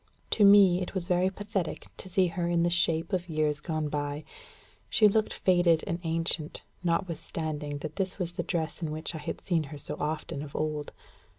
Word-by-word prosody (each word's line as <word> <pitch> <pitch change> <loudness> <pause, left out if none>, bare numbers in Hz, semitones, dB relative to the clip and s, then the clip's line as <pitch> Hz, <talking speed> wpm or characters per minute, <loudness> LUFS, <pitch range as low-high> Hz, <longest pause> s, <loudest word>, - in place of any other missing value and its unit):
To 215 - +4
me, 200 -3 +7
it 180 - -5
was 180 -2 -1
very 180 0 +3
pathetic 195 -3 -3
to 185 - -6
see 185 +1 +3
her 175 0 -2
in 170 -1 +2
the 175 - +2
shapes 165 -1 +2
of 180 -1 -1
years 155 -2 +1
gone 155 -1 -2
by. 145 0 -3 0.7
She 215 - +6
looked 215 +1 +2
faded 175 -3 +3
and 170 - -2
ancient, 165 -2 -2 0.2
notwithstanding 160 -4 -2
that 155 - -7
this 190 -1 -1
was 175 -3 -2
the - - -2
dress 165 -1 -2
in 160 - -2
which 155 +2 -3
I 160 - -5
had 145 - -5
seen 165 -4 0
her 145 +1 -8
so 140 - -3
often 150 -2 -3
of 145 -1 -9
old. 150 -1 -2
165 Hz, 195 wpm, -29 LUFS, 155-180 Hz, 0.7 s, me